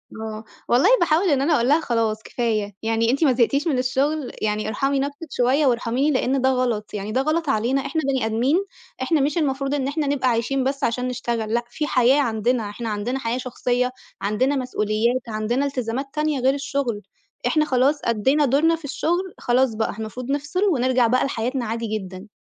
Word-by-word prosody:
آه، 220 0 -6 0.2
والله 255 - +4
باحاول 345 +3 +2
إن 280 -3 +2
أنا 300 +4 +2
أقول 235 - +1
لها: 300 +3 +5
"خلاص 225 -5 -1
كفاية، 215 -4 -2
يعني 225 +1 +1
أنتِ 275 +5 +1
ما 275 -4 +4
زهقتيش 275 +6 +1
من 280 - +1
الشغل 270 +3 0
يعني 215 0 -1
ارحمي 275 +4 0
نفْسِك 285 +4 -4
شوية 260 +5 +2
وارحميني." 250 +3 +1
لإن 265 0 +1
ده 260 - +3
غلط، 245 -5 -1
يعني 205 0 -4
ده 255 - +1
غلط 310 +2 0
علينا، 260 +3 +1
إحنا 315 +3 -1
بني 265 -4 +1
آدمين 255 - +1 0.4
إحنا 300 +3 +2
مش 295 +5 0
المفروض 275 -3 0
إن 275 -2 0
إحنا 290 +1 -1
نبقى 275 -2 +1
عايشين 245 +3 0
بس 275 +2 -2
عشان 250 +1 0
نشتغل، 235 -3 -2
لأ 240 - +1
في 300 +5 -3
حياة 255 +2 +4
عندنا 230 -2 0
إحنا 225 +2 -5
عندنا 215 +5 -2
حياة 235 -1 -2
شخصية 250 0 -1 0.3
عندنا 215 +8 +1
مسؤوليات 235 -1 0
عندنا 225 +5 -1
إلتزامات 255 -1 -2
تانية 300 -2 0
غير 260 +2 +3
الشغل، 275 -6 -2 0.5
إحنا 310 -1 +2
خلاص 275 +2 +2
أدِّينا 265 +7 +2
دورنا 295 +5 +3
في 325 -2 -11
الشغل 350 +6 -1
خلاص 245 -1 +1
بقى 220 -1 -2
المفروض 245 +4 -5
نفصِل 290 +7 -1
ونرجَع 255 -2 +2
بقى 255 +2 +2
لحياتنا 250 0 -2
عادي 230 +1 -3
جدًا. 190 +1 -9
255 Hz, 185 wpm, -22 LUFS, 230-280 Hz, 0.5 s, لها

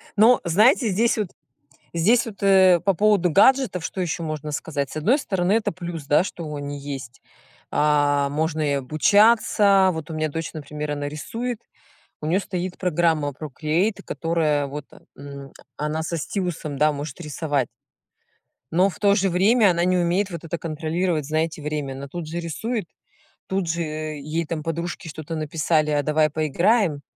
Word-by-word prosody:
Но 225 +4 +6
знаете, 215 - +4
здесь 225 +5 +2
вот, 205 -5 -1 0.6
здесь 225 +9 +3
вот, 205 -3 -8
э, 190 -3 +6
по 195 - +3
поводу 200 -1 +3
гаджетов 230 - +3
что 190 - -4
ещё 170 -1 -2
можно 155 -1 -4
сказать? 145 -2 -3
С - - -5
одной 225 - +3
стороны, 190 -5 0
это 225 -1 +1
плюс, 170 -4 -7
да, 150 +5 +4
что 165 -5 -6
они 145 0 -5
есть. 135 -4 -7 0.5
А, 145 -1 +2
можно 155 +2 -1
и 145 -1 +1
обучаться, 195 - +4
вот 160 0 -6
у - - -5
меня 155 0 -1
дочь, 165 +3 -5
например, 150 0 -5
она 145 0 -3
рисует, 230 +10 -4 0.6
у 155 - -5
неё 180 +5 +2
стоит 185 -1 -4
программа 165 -4 +1
Procreate, 155 - -2
которая 155 -4 0
вот, 145 +1 -7 0.3
м, 140 -1 -10 0.2
она 150 +2 -2
со 170 +1 -3
стилусом, 165 -4 -3
да, 150 0 +4
может 145 +2 -6
рисовать. 145 -4 -2 1.0
Но 185 +4 +3
в 165 - -11
то 200 -1 +4
же 195 -1 +2
время 200 +3 +4
она 170 +1 +1
не 185 0 +2
умеет 180 +3 +1
вот 170 -2 -7
это 165 +1 -4
контролировать, 160 0 -2
знаете, 155 +1 -1
время. 150 -2 -3
Она 140 +1 -7
тут 165 +2 -6
же 170 +2 -4
рисует, 210 +6 -3 0.6
тут 190 -3 -1
же 170 +1 -1
ей 155 0 -3
там 155 -1 -4
подружки 170 +1 -4
что-то 160 +1 -6
написали: 155 0 0
"А 145 -1 +1
давай 155 +1 +2
поиграем". 160 - +1
165 Hz, 165 wpm, -23 LUFS, 150-185 Hz, 1.0 s, Но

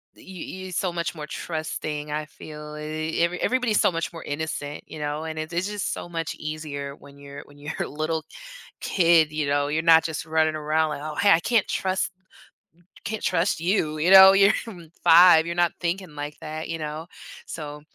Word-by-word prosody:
d - - -18
y - - -16
you 185 0 -8
you're 185 - -8
so 180 +1 -1
much 170 -1 -2
more 150 -2 -7
trusting, 155 -2 -4
I 150 +1 -2
feel. 150 0 -10
E 155 +2 -3
every 175 +1 0
everybody's 245 -4 +1
so - - +3
much 165 -1 -3
more 165 - -8
innocent, 145 -1 -4
you 155 - -9
know, 150 +1 -3
and 160 -1 -5
it 155 +2 -5
it's 175 +3 -1
just 205 -2 -3
so 175 - -7
much 165 -1 -4
easier 150 -2 -6
when 140 0 -16
you're 140 0 -10
when 145 0 -18
you're 150 +2 -6
a - - -1
little 155 +1 -3 0.6
kid, 165 -4 +3
you 155 -2 -2
know, 145 0 +1
you're 155 +2 0
not 160 -1 +7
just 160 -2 -4
running 160 0 +1
around 155 +1 0
like, 150 - -5
"Oh, 155 0 -5
hey, 200 +4 +4
I 165 - +6
can't 225 +3 +1
trust 190 0 -1 0.9
can't 220 0 -4
trust 165 -1 +1
you." 165 -4 0
you 170 +5 +2
know? 190 0 +11
You're 195 +1 +5 0.5
5, 165 -1 +8
you're 170 - -3
not 175 -1 +3
thinking 175 -1 -3
like 145 0 -6
that, 155 +1 -6
you 165 - -3
know? 155 +2 -5 0.4
So, 150 -2 -7
160 Hz, 205 wpm, -24 LUFS, 150-175 Hz, 0.9 s, know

